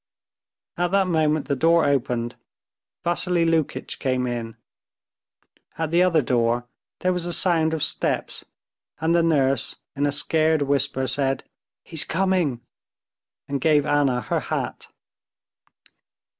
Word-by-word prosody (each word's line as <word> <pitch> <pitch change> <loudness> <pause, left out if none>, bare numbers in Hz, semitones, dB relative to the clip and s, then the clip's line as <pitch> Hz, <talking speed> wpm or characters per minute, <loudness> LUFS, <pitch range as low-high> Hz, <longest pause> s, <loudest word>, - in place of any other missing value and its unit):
At 175 0 +1
that 195 -1 +4
moment 155 -4 +1
the 140 - 0
door 165 +4 +3
opened. 120 -4 0 0.7
Vassily 175 0 +1
Lukitch 165 -3 -1
came 130 -2 0
in. 120 -2 -4 1.2
At 160 -1 -2
the 170 +1 +4
other 170 -5 +3
door 120 0 +1 0.4
there 185 0 +2
was 180 -1 -3
the 175 - -2
sound 160 -3 +2
of 155 - -2
steps, - - -1 0.6
and 160 +1 +1
the 170 - +4
nurse 140 -6 +1 0.2
in 145 +1 +1
a - - 0
scared 155 +1 +2
whisper 135 -1 0
said, 135 0 0 0.4
"He's 160 -3 -1
coming," 175 -8 0 0.9
and 140 -1 -3
gave 150 -1 +3
Anna 145 -4 +2
her - - -1
hat. - - -4
150 Hz, 130 wpm, -23 LUFS, 135-165 Hz, 1.2 s, that